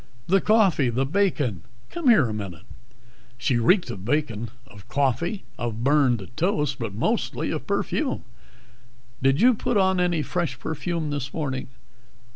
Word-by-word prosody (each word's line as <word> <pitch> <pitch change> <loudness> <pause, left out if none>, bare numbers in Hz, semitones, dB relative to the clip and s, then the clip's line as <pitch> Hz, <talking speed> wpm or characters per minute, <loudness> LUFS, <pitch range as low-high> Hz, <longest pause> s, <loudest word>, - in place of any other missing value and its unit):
"The 195 +2 +3
coffee, 195 - +3
the 130 +3 0
bacon 145 - 0 0.3
come 335 -7 +1
here 160 - +6
a 110 - -4
minute." 100 -4 -6 0.7
She 120 0 +1
reeked 180 - +3
of 95 - -8
bacon, 115 -3 -1 0.2
of 105 -4 -15
coffee, 145 - 0 0.2
of 115 -1 -3
burned 130 -8 +3
toast, 150 -5 0
but 110 -5 -4
mostly 110 - -1
of - - -4
perfume. - - -1 1.0
"Did 135 +2 +3
you 250 +2 +7
put 220 0 -1
on 190 -1 +3
any 175 -3 +1
fresh 175 +1 -2
perfume 160 0 -3
this 140 -2 -3
morning?" 135 -5 -3
145 Hz, 145 wpm, -24 LUFS, 120-180 Hz, 1.0 s, you